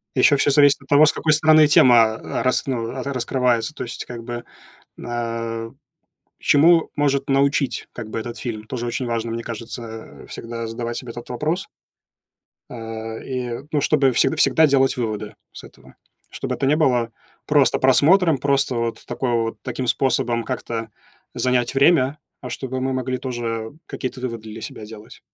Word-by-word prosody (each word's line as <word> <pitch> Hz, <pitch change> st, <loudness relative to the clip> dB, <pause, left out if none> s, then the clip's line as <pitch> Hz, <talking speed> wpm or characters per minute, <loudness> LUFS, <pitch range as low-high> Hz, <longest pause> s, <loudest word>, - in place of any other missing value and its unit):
И 130 Hz, -, 0 dB
ещё 145 Hz, +2 st, +5 dB
всё 145 Hz, -, +2 dB
зависит 145 Hz, 0 st, +5 dB
от 135 Hz, -, -18 dB
того, 145 Hz, +2 st, +7 dB
с -, -, +3 dB
какой 155 Hz, -2 st, +1 dB
стороны 155 Hz, 0 st, +6 dB
тема, 120 Hz, -6 st, +6 dB
а, -, -, -4 dB
рас 130 Hz, -, +1 dB
ну, 120 Hz, -4 st, -2 dB
ра 135 Hz, +2 st, -4 dB
раскрывается. 125 Hz, +1 st, 0 dB
То -, -, -6 dB
есть 120 Hz, -, -6 dB
как 120 Hz, -2 st, -8 dB
бы 120 Hz, 0 st, -6 dB, 0.5 s
н -, -, -10 dB
а, 115 Hz, -1 st, -4 dB, 0.7 s
чему 165 Hz, +3 st, +4 dB
может 140 Hz, -2 st, +1 dB
научить 140 Hz, 0 st, +1 dB
как 115 Hz, -3 st, -7 dB
бы -, -, -3 dB
этот 120 Hz, +1 st, -7 dB
фильм? 110 Hz, -3 st, -5 dB
Тоже 120 Hz, 0 st, -4 dB
очень 125 Hz, +1 st, -3 dB
важно. 115 Hz, -1 st, -2 dB
Мне 115 Hz, -, -4 dB
кажется, 115 Hz, 0 st, -8 dB
а, -, -, -14 dB
всегда 115 Hz, 0 st, -6 dB
задавать 115 Hz, +1 st, -4 dB
себе 125 Hz, -2 st, -7 dB
этот 120 Hz, -, -9 dB
вопрос. 155 Hz, +9 st, -2 dB, 1.0 s
А, 115 Hz, -1 st, -6 dB
и 125 Hz, -2 st, -4 dB
ну, 150 Hz, -2 st, +1 dB
чтобы 140 Hz, -4 st, +3 dB
всегда 140 Hz, -, +2 dB
всегда 160 Hz, 0 st, +4 dB
делать 135 Hz, -1 st, +2 dB
выводы 110 Hz, -3 st, -4 dB, 0.2 s
с -, -, -11 dB
этого. 65 Hz, -1 st, -17 dB, 0.3 s
Чтобы -, -, -4 dB
это -, -, -2 dB
не 145 Hz, +3 st, +3 dB
было 125 Hz, -7 st, +1 dB, 0.3 s
просто 145 Hz, -3 st, +3 dB
просмотром, 155 Hz, +5 st, +4 dB
просто 140 Hz, -2 st, +1 dB
вот 115 Hz, -1 st, -3 dB
такой 120 Hz, 0 st, -2 dB
вот 115 Hz, -1 st, -1 dB
таким 130 Hz, 0 st, -4 dB
способом 120 Hz, -2 st, +1 dB
как-то 115 Hz, -1 st, -4 dB, 0.4 s
занять 125 Hz, -1 st, 0 dB
время, 140 Hz, 0 st, +3 dB, 0.2 s
а -, -, -7 dB
чтобы 130 Hz, -1 st, -4 dB
мы 130 Hz, -, -1 dB
могли 130 Hz, 0 st, -2 dB
тоже 115 Hz, -3 st, -4 dB
какие-то 130 Hz, -1 st, -5 dB
выводы 115 Hz, -3 st, -5 dB
для 110 Hz, +1 st, -8 dB
себя 110 Hz, -, -8 dB
делать. 110 Hz, 0 st, -12 dB
125 Hz, 175 wpm, -21 LUFS, 115-140 Hz, 1.0 s, того